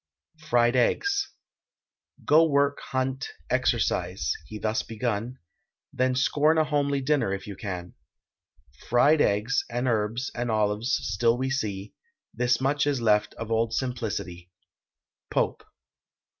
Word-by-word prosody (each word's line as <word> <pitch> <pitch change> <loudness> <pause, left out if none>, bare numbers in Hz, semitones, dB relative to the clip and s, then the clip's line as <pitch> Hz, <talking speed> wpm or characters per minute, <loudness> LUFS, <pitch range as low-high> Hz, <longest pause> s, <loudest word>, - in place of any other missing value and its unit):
FRIED 120 0 +3
EGGS. 400 - +1 1.0
Go 160 +2 +6
work, 140 0 +2
hunt, 130 0 -2 0.2
exercise 90 +2 0
(he 110 - -7
thus 110 +1 -1
begun), 115 +2 -3 0.6
Then 130 0 +1
scorn 150 +4 +3
a 160 - +5
homely 140 -2 0
dinner 140 -6 +1
if 95 - -9
you 100 - -7
can; 90 -4 -6 1.0
Fried 145 +6 +4
eggs, 105 +7 +1
and 120 +2 -2
herbs, 115 +2 -1
and 120 0 -3
olives, 105 +1 0
still 115 +4 +1
we 130 +1 -2
see: 105 -6 -3 0.4
This 120 0 +1
much 145 +2 +1
is 140 -3 +1
left 105 -2 +2
of 115 0 -6
old 115 0 +1
simplicity. 110 -9 -4 0.8
POPE. - - 0
120 Hz, 125 wpm, -26 LUFS, 105-135 Hz, 1.0 s, Go